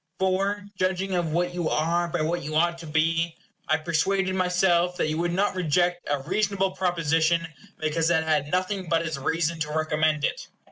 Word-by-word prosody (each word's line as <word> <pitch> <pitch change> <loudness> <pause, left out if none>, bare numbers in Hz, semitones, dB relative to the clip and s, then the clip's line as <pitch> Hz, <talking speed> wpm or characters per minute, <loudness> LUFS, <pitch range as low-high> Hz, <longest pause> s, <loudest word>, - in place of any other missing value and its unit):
For, 195 +2 0
judging 185 +1 -1
of 175 -3 0
what 175 +2 0
you 175 -2 -1
are 170 +3 +1
by 165 - -2
what 170 +3 -1
you 155 +2 -5
ought 170 +1 +2
to 165 - -9
be, 165 +2 0 0.3
I 155 - +3
persuaded 185 +4 0
myself 180 -1 +2
that 155 - 0
you 155 +1 -2
would 175 0 0
not 195 +4 +1
reject 175 +1 0
a 145 -2 -1
reasonable 195 +1 0
proposition 170 -2 +1 0.3
because 160 +1 0
it 160 -2 +3
had 150 -2 0
nothing 185 0 -1
but 165 0 +1
its 160 -4 -3
reason 165 +3 -1
to 150 -1 -2
recommend 155 -1 +1
it. - - -3
170 Hz, 185 wpm, -25 LUFS, 160-185 Hz, 0.3 s, I